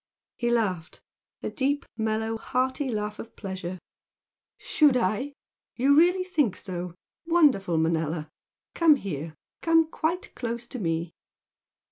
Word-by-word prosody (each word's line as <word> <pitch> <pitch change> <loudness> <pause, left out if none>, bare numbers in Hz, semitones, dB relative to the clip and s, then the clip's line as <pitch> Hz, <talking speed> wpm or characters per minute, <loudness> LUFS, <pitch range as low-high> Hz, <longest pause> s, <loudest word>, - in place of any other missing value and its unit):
He 240 - -1
laughed 200 -9 -1 0.4
a - - -2
deep, 285 +1 0
mellow, 220 0 -1
hearty 260 +4 -1
laugh 210 -2 -3
of 230 - -9
pleasure. 185 -2 -5 0.8
"Should 290 -5 +3
I? 235 +6 0 0.4
You 275 +3 +4
really 355 +4 +5
think 300 - +1
so? 180 -2 -5 0.3
Wonderful 280 - +4
Manella? 160 -1 0 0.5
Come 325 -3 +6
here! 160 - -5 0.3
come 330 -1 +4
quite 340 +3 -2
close 235 -1 -4
to 255 +1 -7
me!" 165 -2 -1
225 Hz, 120 wpm, -27 LUFS, 180-285 Hz, 0.8 s, Come